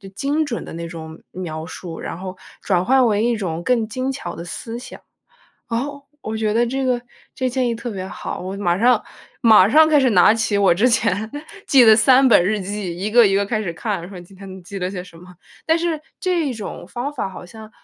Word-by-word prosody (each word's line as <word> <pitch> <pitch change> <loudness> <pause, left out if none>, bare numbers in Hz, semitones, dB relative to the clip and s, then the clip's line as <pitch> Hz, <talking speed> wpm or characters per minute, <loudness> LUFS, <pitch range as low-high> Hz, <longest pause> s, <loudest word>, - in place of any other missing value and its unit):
精 290 +6 0
准 245 -6 -4
的 - - -9
那 170 +1 -5
种 160 -1 -9
描 160 -4 -6
述， 170 -1 -8
然 - - -5
后 185 0 -7 0.2
转 180 -2 0
化 265 +4 +4
为 215 -3 +2
一 240 0 +1
种 175 -6 -4
更 230 0 +1
精 255 +4 -3
巧 260 -10 -6
的 170 - -8
思 225 +6 -6
想。 250 - -11 0.7
哦， 280 +5 -3 0.2
我 220 0 -4
觉 215 -1 0
得 235 +2 +2
这 265 +3 -2
个 250 -2 +1 0.3
这 260 - -1
建 255 0 0
议 235 - -1
特 235 +1 -6
别 190 -3 -5
好， - - -6
我 185 +2 -5
马 175 -4 0
上 240 +1 +4 0.4
马 215 -4 +6
上 310 +6 +6
开 305 -2 +5
始 260 -2 +3
拿 190 +1 +5
起 225 -2 0
我 195 -3 +4
之 215 +8 +3
前 220 -2 0 0.4
记 265 -3 +6
的 220 -1 +8
3 260 +4 +5
本 205 -7 +5
日 210 +2 0
记， 195 -2 -4
一 195 +3 -2
个 240 +1 +6
一 195 - +1
个 200 0 +1
开 215 0 -1
始 180 -5 -3
看， 195 -1 -4
说 185 -3 -9
今 175 +2 -16
天 190 -1 -10
记 200 +2 -7
了 180 0 -2
些 185 -2 -5
什 180 -2 -16
么。 180 +2 -14 0.3
但 325 +1 +2
是 335 -2 -1 0.2
这 355 -4 0
一 - - -2
种 220 -4 -7
方 245 +9 -4
法 255 -8 -3
好 185 -1 -10
像 220 +3 -12
215 Hz, 245 characters per minute, -20 LUFS, 185-250 Hz, 0.7 s, 的